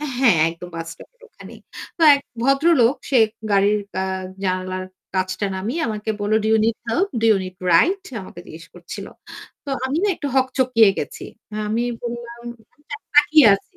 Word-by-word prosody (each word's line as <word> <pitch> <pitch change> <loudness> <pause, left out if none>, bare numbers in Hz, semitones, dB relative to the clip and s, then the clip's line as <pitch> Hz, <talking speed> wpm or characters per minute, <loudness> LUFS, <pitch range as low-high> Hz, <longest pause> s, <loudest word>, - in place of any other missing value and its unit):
অ্যা 300 - -4
হ্যাঁ 240 -9 +4
একদম 170 +2 -10
বাস 165 0 -5
স্টপের - - -17
ওখানেই। - - -14 0.4
তো 335 - -3
এক 280 - -2 0.2
ভদ্রলোক 275 -1 +3 0.2
সে 260 - +4 0.3
গাড়ির 205 +1 +3 0.2
অ্যা 190 - -1 0.4
জানালার 185 0 -2 0.3
কাঁচটা 185 +2 -1
নামিয়ে 230 - -3
আমাকে 215 0 -3
বলল, 205 +1 0
"Do - - +1
you 220 - +4
need 225 0 +1
help? 375 +13 +1
Do - - -1
you - - +2
need 185 0 -9
ride?" 350 - +4
সে 265 - -11
আমাকে 175 - -11
জিজ্ঞেস 165 +1 -11
করছিল। 175 -1 -9 0.6
তো 280 - -6
আমি 265 +3 -1
না 415 - +2
একটু 290 - -5
হকচকিয়ে 255 -4 +3
গেছি। 145 - -5 0.3
অ্যা 210 - -6
আমি 225 +3 0 0.2
বললাম 235 0 -7 0.3
আমি 295 - -31 0.3
তাকিয়ে 295 -2 +6
আছি। 195 - -10
225 Hz, 180 wpm, -21 LUFS, 185-270 Hz, 0.6 s, তাকিয়ে